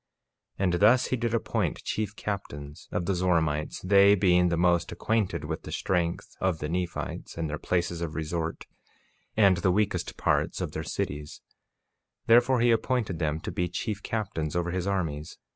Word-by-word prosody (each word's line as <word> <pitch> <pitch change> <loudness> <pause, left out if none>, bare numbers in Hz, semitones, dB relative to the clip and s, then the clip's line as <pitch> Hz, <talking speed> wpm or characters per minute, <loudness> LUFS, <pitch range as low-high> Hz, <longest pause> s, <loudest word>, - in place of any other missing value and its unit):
48:5 - - -2
And 90 - +2
thus 120 +5 +6
he - - 0
did 120 -2 -1
appoint 115 - -1
chief 105 -1 -2
captains 75 -8 -6
of 85 - -1
the 95 - +1
Zoramites, 80 -4 0
they 100 +1 +6
being 90 -2 +4
the 85 - 0
most 85 -1 +2
acquainted 110 -3 -1
with - - -4
the - - -9
strength 85 -2 -1
of 95 -3 +1
the 75 - -4
Nephites, 90 0 -4
and 85 -1 -1
their 75 0 -4
places 85 -1 -1
of 80 -2 -4
resort, 80 +1 -3 0.7
and 100 -4 +5
the 90 +1 +1
weakest 95 -2 0
parts - - +1
of - - -3
their 80 - -4
cities; 75 -1 -4 0.8
therefore 120 +2 +5
he 120 0 +5
appointed 115 -6 0
them 80 -1 0
to - - -5
be 90 0 -1
chief 100 +3 -3
captains 90 -10 -3
over 85 0 0
his 90 +1 -2
armies. 80 -6 -2
90 Hz, 175 wpm, -28 LUFS, 80-100 Hz, 0.8 s, thus